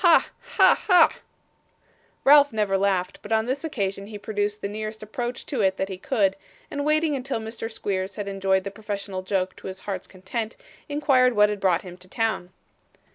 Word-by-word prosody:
Ha! 345 -3 +5 0.3
ha! - - +6
ha!' 360 -4 +7 1.1
Ralph 285 0 +7
never 210 -3 0
laughed, 190 -2 0
but 205 - -10
on 220 0 +3
this 260 +5 -2
occasion 200 -9 -3
he 210 -1 -7
produced 205 0 -2
the - - 0
nearest 215 +1 -5
approach 240 +3 -4
to 260 -6 -2
it 190 -1 +2
that 190 - -2
he 190 - -5
could, 195 -5 +1 0.4
and 285 0 -2
waiting 305 0 +2
until 265 -2 -2
Mr. 225 +1 -6
Squeers 195 -3 -3
had 205 -2 -4
enjoyed 195 -1 +1
the 200 - -5
professional 200 -2 -5
joke 185 -1 -1
to - - -9
his 190 0 -7
heart's 195 -3 -5
content, 215 +4 -5 0.3
inquired 270 -4 +3
what 210 0 +5
had 210 -1 -3
brought 185 -3 +2
him 180 -2 -10
to 185 - -13
town. 220 -3 -1
210 Hz, 185 wpm, -25 LUFS, 195-240 Hz, 1.1 s, ha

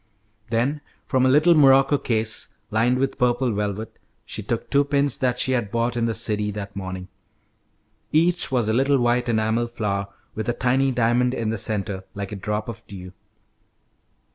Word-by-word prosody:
Then 125 +6 0 0.2
from 130 -2 +2
a - - +4
little 150 +6 +5
morocco 135 -1 +5
case, 110 -3 -1 0.2
lined 115 +4 +2
with 135 +1 -1
purple 125 0 +2
velvet, 105 +2 -4 0.3
she - - -6
took - - -3
two 140 0 +4
pins 140 -1 +1
that 125 -1 0
she 130 - +1
had 120 -5 0
bought 115 +2 -1
in 115 -1 0
the 115 - -1
city 105 -1 0
that 100 -1 -6
morning. 95 -1 -6 1.0
Each 170 +2 +2
was 120 -4 +1
a 110 - +1
little 135 +3 +3
white 120 0 +1
enamel 110 +1 +1
flower 100 -4 -2 0.3
with 110 +1 -4
a - - +2
tiny 130 +3 +1
diamond 125 +1 +1
in 110 -2 -2
the 115 - -2
centre, 100 -2 -1
like 100 0 -5
a - - -4
drop 105 +2 -3
of 115 -1 -7
dew. 90 -2 -10
115 Hz, 175 wpm, -23 LUFS, 105-130 Hz, 1.0 s, little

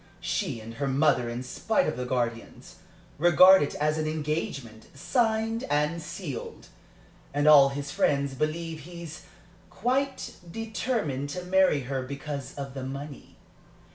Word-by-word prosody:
She 115 - -2
and 110 +1 -9
her 140 - +1
mother, 135 -3 +2
in 120 +2 -4
spite 220 - 0
of - - -1
the 125 0 -4
guardians, 120 -2 -3 0.4
regard 185 +3 +8
it 145 - -1
as 155 +1 0
an 155 - -1
engagement 150 -7 -3
signed 225 - 0
and 150 +3 +1
sealed, 160 -6 -7 0.7
and 145 +1 +2
all 140 -3 +8
his 140 0 -5
friends 140 -1 +1
believe 160 +3 -2
he's 170 0 -9 0.4
quite 265 +4 -1
determined 220 - -2
to 180 +5 -5
marry 185 -5 +3
her 130 +1 -3
because 140 +1 -6
of 140 -2 -6
the 135 -1 -6
money. 140 +1 -7
150 Hz, 140 wpm, -27 LUFS, 135-175 Hz, 0.7 s, regard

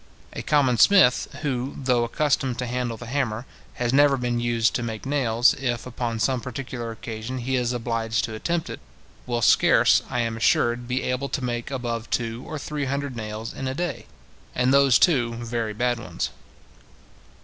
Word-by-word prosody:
A - - -5
common 135 -6 +2
smith, 190 -11 +5 0.2
who, 130 -2 -2
though 125 -3 +1
accustomed 130 0 0
to 125 - -2
handle 120 -1 -2
the 120 - -9
hammer, 120 -2 -2 0.3
has 120 0 -1
never 140 0 +5
been 120 -1 -1
used 120 -1 +1
to - - -1
make 110 -1 -5
nails, 125 -4 +3
if, 120 -4 -3
upon 120 -2 -3
some 125 +1 +1
particular 130 -2 -5
occasion, 115 +2 -6
he 130 +2 -2
is 125 -1 0
obliged 115 -2 -1
to 110 - -7
attempt 170 +9 -2
it, - - -7 0.5
will 120 -1 -1
scarce, - - +5
I 120 - 0
am 115 -1 -2
assured, 120 +1 +2
be 125 +2 -1
able 125 +2 -2
to 135 - -3
make 120 0 -3
above 120 -4 -4
two 115 +1 -2
or 155 - -5
three 145 0 -3
hundred 140 -1 -3
nails 110 0 -5
in 135 - -5
a 130 - -3
day, 160 -6 -4 0.5
and 125 +2 +2
those, 140 -2 +6
too, 120 -9 +3
very 115 -2 -3
bad 120 +1 0
ones. 90 -7 -4
125 Hz, 180 wpm, -24 LUFS, 115-135 Hz, 0.5 s, those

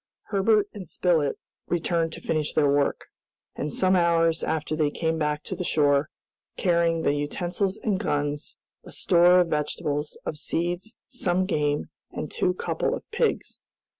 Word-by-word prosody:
Herbert 210 +1 +3
and 195 -4 -8
Spilett 160 -4 +1 0.3
returned 170 -1 0
to - - -8
finish 155 -2 -1
their 150 -2 +4
work; 140 0 +1 0.5
and 150 - -3
some 185 +4 +3
hours 165 -2 +3
after 155 -1 -1
they 155 -2 +2
came 160 +2 -1
back 150 -1 -1
to - - -5
the 180 - -3
shore, 145 -3 +2 0.5
carrying 170 -2 +2
the 145 - +3
utensils 175 +7 -1
and 200 -4 -1
guns, 145 -5 -2 0.3
a - - -12
store 180 0 +5
of 175 - 0
vegetables, 150 -1 -2
of 150 - -3
seeds, 175 +8 -2
some 185 -8 0
game, 150 -5 -1 0.2
and - - -6
two 180 - +1
couple - - -1
of - - -8
pigs. 465 +1 -1
165 Hz, 155 wpm, -26 LUFS, 150-180 Hz, 0.5 s, store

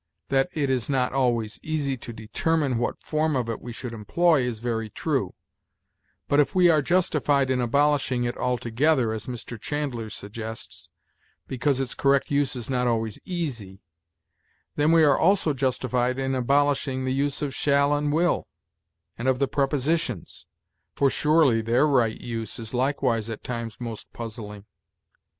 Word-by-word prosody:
That 135 +4 +2
it 140 -4 0
is 125 -1 -1
not 130 -2 +1
always 120 -5 0
easy 150 -4 -1
to 120 -1 -8
determine 130 +4 -1
what 120 - -2
form 155 -1 0
of 125 -3 0
it 115 - -4
we 120 - -7
should 120 +1 -6
employ 155 +8 +2
is 125 -2 -2
very 115 -1 -3
true; - - -2 0.9
but 145 - +3
if 145 +6 +2
we 180 -2 +6
are 155 -2 +3
justified 145 -5 +2
in 125 -1 +1
abolishing 135 0 +2
it 120 0 -2
altogether, 125 +1 +1
as 110 -1 -6
Mr. 120 -2 -7
Chandler 135 -7 -3
suggests, 110 +2 -8 0.6
because 135 +1 0
its 135 -2 -2
correct 140 0 +2
use 140 -1 +1
is 120 -3 -5
not 125 -2 0
always 115 -3 -1
easy, 125 - -5 0.9
then 150 +2 +3
we 165 -1 +6
are 145 -2 +4
also 175 -3 +3
justified 125 -1 0
in 135 0 -1
abolishing 135 0 +1
the 130 - 0
use 140 +2 -1
of 140 -2 -2
shall 140 +1 +2
and 145 0 0
will, 170 +4 +1 0.7
and 120 - -2
of 130 -1 +3
the 140 +1 +1
prepositions, 140 - -1 0.5
for 140 -1 +3
surely 150 -7 +3
their 120 +6 +3
right 125 -7 +2
use 115 -3 -5
is 115 0 -7
likewise 125 -3 0
at 110 - -6
times 115 -2 -5
most 115 -3 -7
puzzling. 105 -3 -7
130 Hz, 160 wpm, -25 LUFS, 115-145 Hz, 0.9 s, we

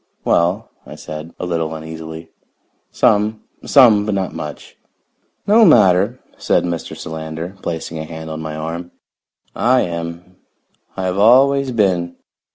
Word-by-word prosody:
"Well," 90 +7 +1
I - - -11
said, 75 +2 -9
a - - -3
little 80 -2 -2
uneasily, 80 +1 -9 0.6
"some. 105 +1 +1 0.2
Some, 115 -7 +6
but 105 -1 -2
not 95 -1 -2
much." 75 -1 -8 0.7
"No 220 +3 +5
matter," 100 - +4 0.2
said - - +1
Mr. 85 -2 -4
Solander, 80 +3 -6
placing 80 -1 -5
a 80 - -5
hand 80 0 -8
on 80 0 -5
my 80 -1 -5
arm. 85 +3 -5 0.7
"I 125 +2 +3
am. 85 +1 -6 0.6
I 95 - -3
have 95 +1 -1
always 135 +5 +5
been. 90 -7 0
85 Hz, 135 wpm, -18 LUFS, 80-105 Hz, 0.7 s, Some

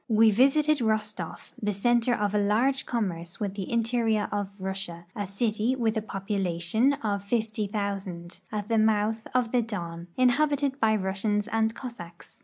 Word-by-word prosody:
We 220 0 +6
visited 285 +6 +4
Rostoflf, 215 -2 -2
the 210 -1 0
center 240 +4 +2
of 205 -1 -1
a 210 - +3
large 235 +7 +2
commerce 175 -8 -3
with 200 -2 -2
the 195 -2 -5
interior 230 -2 +1
of 200 -1 -3
Russia, 190 -3 -4
a 205 -1 -3
city 215 +4 0
with 230 -3 0
a 220 - 0
population 195 +3 0
of 200 -2 -1
50,000, 200 -5 -3
at 210 -2 -3
the 225 -1 +2
mouth 220 0 +1
of 245 -3 +2
the 245 - +3
Don, 170 -6 -5
inhabited 280 +2 +2
by 220 -1 +3
Russians 205 +2 -1
and 225 0 +1
Cossacks. 175 -10 -10
215 Hz, 155 wpm, -27 LUFS, 195-235 Hz, -, We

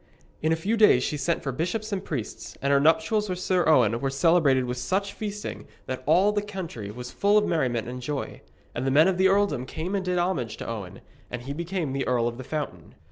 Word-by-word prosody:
In 155 - +1
a - - +4
few 200 +8 -1
days 210 - +6
she - - -1
sent 155 +4 -1
for 135 - -2
the 130 - -10
bishops 215 +6 -2
and 195 -2 -2
priests, 130 -9 -6
and 140 +1 +1
her 140 - +5
nuptials 160 +8 +2
with 180 - -2
Sir 185 -1 +1
Owen 115 -7 +4
were 135 - -1
celebrated 140 -2 +3
with 125 0 -3
such 195 +10 -1
feasting 210 -1 -6 0.2
that 130 0 -4
all 185 +7 +5
the 210 0 0
country 185 - -6
was 125 +4 -7
full 205 +1 +3
of 210 - +3
merriment 125 - 0
and 125 +1 -6
joy. 140 +2 -4 0.3
And 130 - -2
the - - +3
men 150 +6 +5
of 185 -1 0
the 190 - +6
earldom 195 -10 +1
came 170 +8 -4
and 195 -2 0
did 180 -1 -1
homage 170 -11 -1
to - - -7
Owen, 100 -5 -6 0.3
and 120 0 -6
he 140 +2 -5
became 170 -2 -3
the 135 0 -2
Earl 120 -2 +2
of 120 +1 -5
the - - -5
Fountain. 125 - -5
155 Hz, 240 wpm, -26 LUFS, 125-190 Hz, 0.3 s, days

